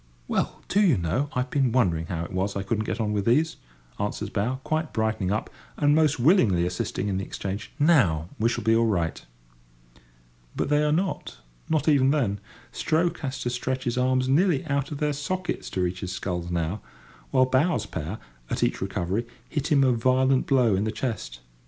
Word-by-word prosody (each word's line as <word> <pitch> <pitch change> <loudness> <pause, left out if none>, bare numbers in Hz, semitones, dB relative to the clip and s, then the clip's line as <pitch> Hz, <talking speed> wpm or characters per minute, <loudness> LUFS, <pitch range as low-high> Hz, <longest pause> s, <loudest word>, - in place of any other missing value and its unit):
"Well, - - -2
do 205 - +2
you 175 - +4
know, 90 - -1
I've 125 0 -2
been 135 -4 +2
wondering 85 -10 +1
how 85 -1 -3
it 95 - -10
was 95 +2 -1
I 100 - -2
couldn't 110 +2 -1
get 100 +3 -3
on 105 -2 0
with 100 -1 -1
these," 155 +7 +2 0.4
answers 105 +1 -3
bow, 110 +5 0
quite 155 0 -2
brightening 110 -4 0
up, 110 - -2 0.3
and 145 -1 +3
most 155 -3 +3
willingly 120 - +4
assisting 90 +3 -2
in 95 -2 -1
the - - -3
exchange. 100 +2 -5
"Now 110 - +3
we 115 +2 +3
shall - - -2
be 110 0 +4
all 115 0 +3
right." 85 -6 -1 1.3
But - - -1
they 150 0 +3
are 150 - +2
not—not 150 - -3
even 140 -3 +5
then. 120 -9 +1 0.3
Stroke 165 +2 0
has 135 -2 -4
to 120 - -1
stretch 130 +1 -2
his 120 -2 -1
arms 130 0 +2
nearly 160 +2 +3
out 140 -2 -1
of 145 - -4
their 150 0 0
sockets 180 +6 -3
to 95 - -2
reach 90 0 -1
his 95 -1 -4
sculls 90 -2 -3
now; 85 +3 -2 0.5
while 130 - +4
bow's 135 +7 +1
pair, 80 +8 -5 0.3
at - - -1
each - - 0
recovery, 95 +4 -2 0.2
hit 150 -1 -2
him 140 -2 +5
a 130 - +4
violent 130 +2 +2
blow 125 -6 +4
in 95 - 0
the 110 - -1
chest. 105 - -4
120 Hz, 195 wpm, -26 LUFS, 95-145 Hz, 1.3 s, even